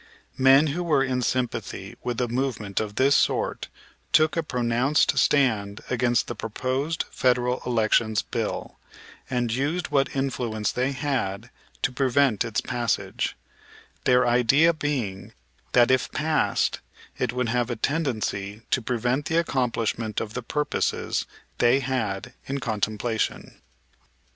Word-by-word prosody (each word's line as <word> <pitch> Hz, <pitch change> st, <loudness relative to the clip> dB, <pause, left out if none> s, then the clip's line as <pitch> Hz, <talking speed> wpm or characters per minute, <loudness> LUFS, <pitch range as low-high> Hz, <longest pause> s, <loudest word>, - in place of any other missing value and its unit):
Men 135 Hz, +3 st, +6 dB
who 175 Hz, -, -2 dB
were 150 Hz, -6 st, +2 dB
in 130 Hz, -1 st, -1 dB
sympathy 115 Hz, -6 st, -2 dB
with 120 Hz, -2 st, -2 dB
a 125 Hz, -, +1 dB
movement 120 Hz, -5 st, -2 dB
of 105 Hz, -1 st, -4 dB
this 140 Hz, +2 st, +4 dB
sort -, -, +1 dB, 0.4 s
took 155 Hz, 0 st, +4 dB
a 165 Hz, -, +1 dB
pronounced 125 Hz, +1 st, +1 dB
stand 110 Hz, -8 st, +2 dB
against 120 Hz, -1 st, +2 dB
the -, -, -4 dB
proposed 130 Hz, +8 st, -2 dB
Federal 125 Hz, 0 st, +1 dB
Elections 110 Hz, -2 st, +2 dB
Bill, -, -, -4 dB, 0.5 s
and 120 Hz, -3 st, 0 dB
used 145 Hz, +8 st, -1 dB
what 140 Hz, -1 st, +1 dB
influence 120 Hz, -5 st, -1 dB
they 130 Hz, +2 st, 0 dB
had 130 Hz, -6 st, -2 dB, 0.3 s
to -, -, +2 dB
prevent 130 Hz, -3 st, +2 dB
its 115 Hz, -4 st, -1 dB
passage; 120 Hz, -3 st, -2 dB, 0.7 s
their 125 Hz, -1 st, +4 dB
idea 125 Hz, +7 st, +4 dB
being 130 Hz, -12 st, -3 dB, 0.4 s
that, 120 Hz, 0 st, +5 dB
if 130 Hz, -, +1 dB
passed, 155 Hz, +1 st, +1 dB, 0.4 s
it 125 Hz, -2 st, 0 dB
would 125 Hz, -1 st, -1 dB
have 120 Hz, 0 st, 0 dB
a 120 Hz, -, -1 dB
tendency 110 Hz, -7 st, -2 dB
to 125 Hz, -, +2 dB
prevent 125 Hz, +4 st, -1 dB
the 165 Hz, -, 0 dB
accomplishment 115 Hz, -7 st, 0 dB
of 110 Hz, -1 st, -5 dB
the 125 Hz, -, -3 dB
purposes 150 Hz, +5 st, -1 dB, 0.3 s
they 120 Hz, +3 st, +4 dB
had 125 Hz, -3 st, -2 dB
in 140 Hz, +1 st, -2 dB
contemplation. 110 Hz, -1 st, -2 dB
125 Hz, 130 wpm, -25 LUFS, 115-135 Hz, 0.7 s, Men